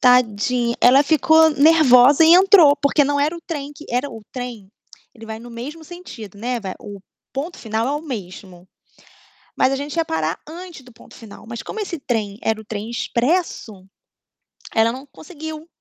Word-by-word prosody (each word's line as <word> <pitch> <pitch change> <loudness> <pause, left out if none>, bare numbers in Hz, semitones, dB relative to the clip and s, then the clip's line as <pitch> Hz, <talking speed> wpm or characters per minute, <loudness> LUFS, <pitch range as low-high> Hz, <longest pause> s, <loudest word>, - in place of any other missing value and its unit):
Tadinha, 245 -1 +2
ela 265 +3 +6
ficou 315 +1 +4
nervosa 285 -2 +5
e 320 - +7
entrou 365 -5 +7
porque 285 +1 +2
não 285 +1 0
era 305 +4 0
o 335 - -10
trem 290 -5 -6
que 300 - -13
era 250 +4 -1
o 225 - -10
trem, 245 -6 -7 0.5
ele 225 -2 -13
vai 220 0 -6
no 240 +2 -12
mesmo 280 +8 -8
sentido, 265 - -11
né, 245 +3 -2
vai 190 -4 -6
o 205 -2 -10 0.3
ponto 300 +6 -5
final 220 0 -2
é 275 - -1
o 295 - -2
mesmo. 185 - -9 0.9
Mas 265 - +2
a - - 0
gente 285 +3 -6
ia 330 - +1
parar 160 - -2
antes 345 -2 -10
do 250 -1 -17
ponto - - -18
final. 220 -2 -13
Mas 235 0 -7
como 440 - -7
esse 360 -5 -4
trem 215 -7 -3
era 220 -1 -1
o - - -13
trem 215 0 -6
expresso, 240 - -2 0.9
ela 225 +1 +3
não 260 +2 -9
conseguiu. 315 +1 -10
255 Hz, 180 wpm, -20 LUFS, 225-310 Hz, 0.9 s, e